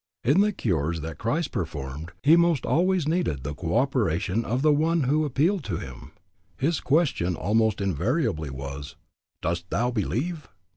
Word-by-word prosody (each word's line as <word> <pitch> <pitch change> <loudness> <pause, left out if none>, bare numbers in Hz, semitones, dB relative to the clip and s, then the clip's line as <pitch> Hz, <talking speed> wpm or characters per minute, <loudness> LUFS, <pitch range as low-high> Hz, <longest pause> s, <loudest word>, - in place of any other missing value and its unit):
In 145 +11 +4
the 210 +1 +3
cures 85 - -1
that 80 0 -6
Christ 145 +8 -1
performed 75 -1 -5
he 155 +4 +7
most 170 -4 +3
always 175 +4 +2
needed 155 - 0
the 70 +2 -3
co 80 +7 -1
operation 115 - +1
of 125 +4 -1
the 155 -1 +5
one 160 +2 +2
who 150 +4 +2
appealed 155 +6 +1
to 90 -6 -2
him. 65 -5 -9 0.4
His 155 - +1
question 135 - +1
almost 110 +4 +1
invariably 80 -4 0
was, 70 +2 -7 0.5
"Dost 85 +1 -2
thou 120 +5 0
believe?" 140 - -2
115 Hz, 155 wpm, -26 LUFS, -, 0.5 s, he